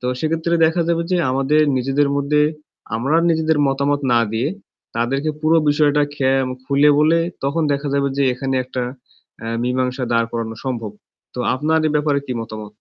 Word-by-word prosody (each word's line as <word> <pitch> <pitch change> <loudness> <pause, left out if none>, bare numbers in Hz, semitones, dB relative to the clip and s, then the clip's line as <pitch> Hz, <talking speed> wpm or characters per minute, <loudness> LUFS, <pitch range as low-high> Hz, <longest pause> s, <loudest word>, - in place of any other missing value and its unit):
তো 125 - -4
সেক্ষেত্রে 165 +3 -1
দেখা 165 +2 +1
যাবে 170 0 +1
যে 180 - +2
আমাদের 135 +3 +2 0.2
নিজেদের 135 +3 +1
মধ্যে 145 +1 +2 0.5
আমরা 135 +8 +1
নিজেদের 160 -1 +1
মতামত 140 +1 0
না 120 - +4
দিয়ে 115 +5 0 0.5
তাদেরকে 135 +6 0
পুরো 160 +1 +3
বিষয়টা 145 0 +3
খে 130 -2 +1 0.3
খুলে 140 +2 +4
বলে 155 +2 +4 0.3
তখন 145 +4 0
দেখা 140 +1 -2
যাবে 140 0 +1
যে 140 - +1
এখানে 135 +1 -3
একটা 125 0 -4 0.6
অ্যা 115 - -6
মীমাংসা 125 +1 -1
দাঁড় 115 0 +2
করানো 115 -1 -4
সম্ভব। 120 -5 -3 0.4
তো - - -7 0.2
আপনার 155 +5 +1
এ - - -2
ব্যাপারে 145 -1 +1
কী 130 - -3
মতামত? 110 -1 -7
140 Hz, 170 wpm, -19 LUFS, 125-150 Hz, 0.6 s, না